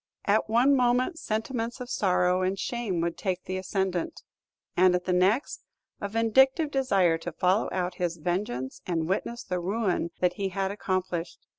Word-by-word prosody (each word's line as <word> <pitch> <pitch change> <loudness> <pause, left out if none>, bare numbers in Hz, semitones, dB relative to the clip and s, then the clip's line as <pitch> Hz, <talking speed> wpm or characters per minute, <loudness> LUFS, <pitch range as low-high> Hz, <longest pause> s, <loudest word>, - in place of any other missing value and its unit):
At 215 +2 +2
one 250 +5 +4
moment, 255 +6 +2
sentiments 230 +2 -3
of 250 - -6
sorrow 180 -4 +2
and 185 +1 0
shame 215 -7 -2
would 170 0 -2
take 185 -2 -2
the 185 - -4
ascendant; 185 -2 -2 0.5
and 180 0 +5
at 180 - -1
the 185 - +1
next, 195 +9 +1 0.4
a 200 - -3
vindictive 265 - +3
desire 195 -12 +2
to - - -5
follow 185 +4 +1
out 180 -1 -1
his 175 -1 -1
vengeance 155 -7 -3
and 165 -3 -1
witness 235 +5 -2
the 180 -1 -2
ruin 190 -1 -1
that 180 -1 +2
he 195 -1 -1
had 195 0 -2
accomplished. 185 -4 -3
190 Hz, 165 wpm, -27 LUFS, 180-230 Hz, 0.5 s, and